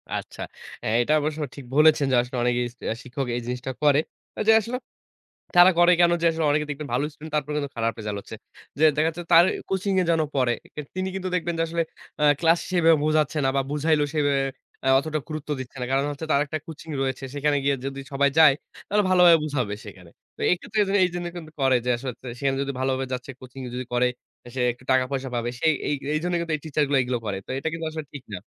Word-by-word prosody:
আচ্ছা। - - -6 0.4
আ - - -3
এটা 150 +6 +1
অবশ্য 155 +1 -2 0.2
ঠিক 140 -3 -9
বলেছেন, 150 -1 +5
যে - - +4
আসলে 125 +1 -6
অনেকেই 120 0 +1
সে 125 - -21
আ - - -9
শিক্ষক 130 +1 -4
এই - - -3
জিনিসটা 125 +1 -3
করে। 145 0 +5 0.5
যে - - +8
আসলো 240 +4 -4 0.8
তারা 175 +1 +9
করে 175 +1 +6
কেনো 175 0 +5
যে - - +3
আসলে 160 -1 -2
অনেকে 150 +1 +1
দেখবেন 145 0 -5
ভালো 140 +4 +1
স্টুডেন্ট 155 +1 -11
তারপর 150 0 -1
কিন্তু 140 -2 -2
খারাপ 115 0 0
রেজাল্ট 105 -2 -4
হচ্ছে। 110 - -10 0.4
যে 160 - +4
দেখা 155 +1 +3
যাচ্ছে 170 +2 -5
তার 170 +1 +9 0.2
কোচিং 190 +1 -1
এ - - +3
যেন 165 -1 +3 0.2
পড়ে। 125 -2 +3 0.4
তিনি 185 0 -1
কিন্তু 190 -1 -3
দেখবেন 170 -1 -1
যে - - +2
আসলে 170 0 0 0.4
আ - - +5 0.2
ক্লাস 165 0 +4
সেভাবে 165 -3 +5
বুঝাচ্ছে 155 0 +1
না - - +3
বা - - +3
বুঝাইলেও 150 0 +2
সেভাবে 145 -2 +2 0.4
আ - - +4
অতটা 155 +2 -2
গুরুত্ব 155 -1 -6
দিচ্ছে 130 +1 -9
না। - - -1
কারণ 135 +1 +2
হচ্ছে 145 +3 -6
তার 140 - +4
একটা 155 +2 -3
কোচিং 160 0 -9
রয়েছে। 135 0 -2
সেখানে 145 0 +1
গিয়ে 140 -1 +2
যদি, 135 0 -5
সবাই 140 +1 +3
যায় 150 -4 +8 0.3
তাহলে 210 0 +2
ভালোভাবে 180 -2 +7
বুঝাবে 125 -9 -2
সেখানে। 90 -4 -12 0.3
তো - - -15
এক্ষেত্রে 215 +5 -3
এজন্য 200 +1 +1
এইজন্য 175 -1 -3
কিন্তু 160 -2 -8
করে 130 -1 +4
যে - - +2
আসলে 130 +1 -5 0.3
সেখানে 135 -1 0
যদি 140 0 -3
ভালোভাবে 130 0 0
যাচ্ছে 130 +2 -4
কোচিং 130 +1 -11
যদি 125 +1 -3
করে, 125 +1 +3 0.5
সে 130 - -1
একটু 125 +2 -19
টাকা-পয়সা 130 +1 0
পাবে। 120 0 -1
সে 160 - 0 0.2
এই 145 - +1 0.2
এইজন্যই 175 +3 0
কিন্তু 165 -2 -3
এই 145 - -14
টিচার 150 -1 +1
গুলো 140 -1 +3
এগুলো 125 -1 -1
করে। 95 -2 -2
তো - - -11
এটা 160 - -2
কিন্তু 165 -1 -4
আসলে 155 -1 -5
ঠিক 140 -3 -8
না। 95 - -3
145 Hz, 225 wpm, -25 LUFS, 130-165 Hz, 0.8 s, তারা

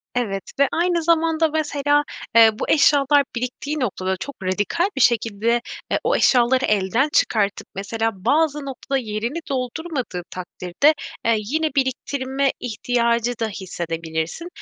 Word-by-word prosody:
Evet 200 -6 -1 0.2
ve 280 - +5
aynı 345 0 +1
zamanda, 325 -1 +2
mesela, 290 -1 +1 0.3
eee, 225 -1 +9
bu - - -3
eşyalar 285 -1 +4
biriktiği 255 +5 -3
noktada 190 -6 -1
çok 280 +9 -7
radikal 205 - 0
bir 270 - 0
şekilde, 230 0 +2 0.3
eee, - - +2
o 485 +2 +2
eşyaları 255 +1 +3
elden 215 +8 +1
çıkartıp, 205 -3 +1
mesela, 225 +3 -1
bazı 290 +9 +1
noktada 275 0 -3
yerini 230 +6 -3
doldurmadığı 255 - -3
takdirde, 185 - 0 0.3
eee, 230 0 +4
yine 310 +10 -1
biriktirme 265 0 0
ihtiyacı 235 0 0
da 225 - 0
hissedebilirsin. 165 - -4
245 Hz, 125 wpm, -22 LUFS, 210-290 Hz, 0.3 s, eee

